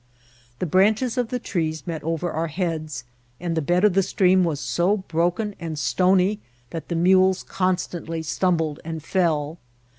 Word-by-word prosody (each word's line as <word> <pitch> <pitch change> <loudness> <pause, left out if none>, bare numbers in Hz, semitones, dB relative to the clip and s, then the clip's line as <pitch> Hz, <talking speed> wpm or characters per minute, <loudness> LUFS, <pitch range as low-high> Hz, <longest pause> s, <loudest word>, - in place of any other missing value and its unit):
The - - -2
branches 215 - +2
of 250 -2 0
the 250 +2 -2
trees 160 - -3
met 160 -3 -4
over 165 +2 -2
our 165 +1 -1
heads, 155 -5 -3 0.4
and 170 -1 -2
the 160 - +1
bed 175 +5 +1
of 210 -3 +5
the 195 - +4
stream 185 -1 +3
was 160 -5 -1
so 175 - +1
broken 180 +3 -1
and 165 -3 -5
stony 185 +5 +2 0.3
that 165 -2 -6
the 170 - -2
mules 185 +2 +4
constantly 175 -3 -2
stumbled 160 -2 0
and 160 -1 -6
fell. 160 -3 0
175 Hz, 160 wpm, -23 LUFS, 160-190 Hz, 0.4 s, of